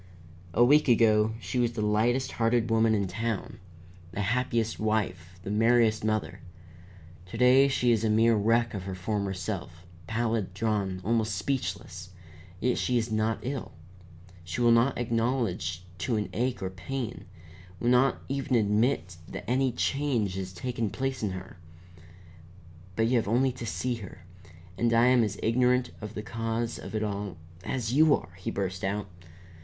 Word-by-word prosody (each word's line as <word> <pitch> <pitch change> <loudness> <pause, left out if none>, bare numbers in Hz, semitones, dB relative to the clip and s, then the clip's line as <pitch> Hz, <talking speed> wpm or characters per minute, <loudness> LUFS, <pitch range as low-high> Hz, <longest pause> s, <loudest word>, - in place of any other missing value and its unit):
"A 120 - +6
week 150 +4 +5
ago 110 -2 +4
she 125 - -3
was 120 -1 +1
the 110 -2 -2
lightest 120 +5 +1
hearted 115 0 +1
woman 110 0 +4
in 100 -1 0
town, 110 +3 -3 0.5
the 105 - -2
happiest 115 +1 0
wife, 95 -5 -2
the 100 - -4
merriest 115 0 +3
mother. 110 -1 -1 0.9
To 100 - -7
day 130 +3 +6
she 125 -3 +2
is 115 -2 +2
a 110 - +2
mere 115 +2 +4
wreck 115 +3 +2
of 95 -3 -5
her 95 -1 -4
former 100 +1 -2
self, 90 -1 -5 0.2
pallid, 110 -4 -1
drawn, 100 -3 -1
almost 110 -2 +1
speechless, 95 -6 -3 0.5
yet 125 +4 +1
she 125 - +1
is 115 -1 -1
not 110 +1 0
ill. 130 0 -4 0.7
She 85 0 -5
will 120 -1 +5
not 115 +4 +3
acknowledge 115 -7 -1 0.2
to 105 +7 -1
an 105 -1 -1
ache 125 -2 -1
or 95 - -2
a - - -13
pain; 105 0 -5 0.5
will 120 - +1
not 125 +2 +3
even 135 -1 -1
admit 105 - +1
that - - -8
any 130 +1 +2
change 125 -5 0
has 95 -1 -4
taken 115 +3 -3
place 135 +4 -3
in 105 - 0
her. 95 0 -8 1.4
But 115 - +2
you 120 +2 +3
have 115 - 0
only 125 +5 +2
to 120 -1 -7
see 125 +2 -1
her. 95 -4 -11 0.5
And 120 0 +2
I 115 +1 +5
am 125 -2 +5
as 105 -1 -2
ignorant 125 +2 +2
of 105 +1 -7
the 105 - -4
cause 115 +1 -3
of - - -7
it 110 - 0
all 100 -4 -4 0.3
as 120 +1 -2
you 155 +1 +6
are!" 85 - -9
he - - -4
burst 95 -1 -3
out. 100 +1 -2
115 Hz, 170 wpm, -28 LUFS, 100-120 Hz, 1.4 s, A